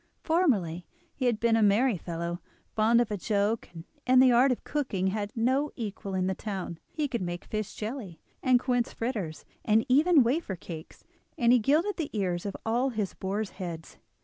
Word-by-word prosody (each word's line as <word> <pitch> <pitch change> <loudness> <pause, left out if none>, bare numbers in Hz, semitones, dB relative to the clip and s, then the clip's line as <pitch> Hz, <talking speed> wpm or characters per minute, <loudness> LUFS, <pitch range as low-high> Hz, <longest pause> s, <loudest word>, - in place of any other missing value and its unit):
Formerly 205 - +1 0.3
he 260 - -3
had 230 -3 +1
been 230 -1 +3
a 225 - +3
merry 215 +4 +4
fellow, 170 0 -4 0.3
fond 225 +2 +4
of 240 - +1
a 210 - -1
joke, 210 +3 0
and 165 -2 -9 0.2
in 255 0 +5
the 255 -1 +7
art 250 +3 +5
of 250 - -2
cooking 210 -11 -1
had 205 0 -2
no 260 +6 +1
equal 200 -4 -5
in 185 -1 +1
the 190 - 0
town. 190 -4 -5
He 305 -2 -2
could 240 -5 -3
make 175 -1 -4
fish 215 -1 -4
jelly, 215 - -6 0.2
and 255 -2 +4
quince 245 -1 0
fritters, 210 -10 -4 0.2
and 220 +1 +3
even 295 +3 +5
wafer 245 - -1
cakes; 165 -2 -10 0.3
and 235 0 +4
he 250 - +6
gilded 315 - +2
the 320 -4 -2
ears 185 -3 -1
of 200 - -5
all 240 +4 +1
his 215 -6 -3
boars' 200 +2 -3
heads. 165 -3 -7
220 Hz, 190 wpm, -28 LUFS, 190-255 Hz, 0.3 s, the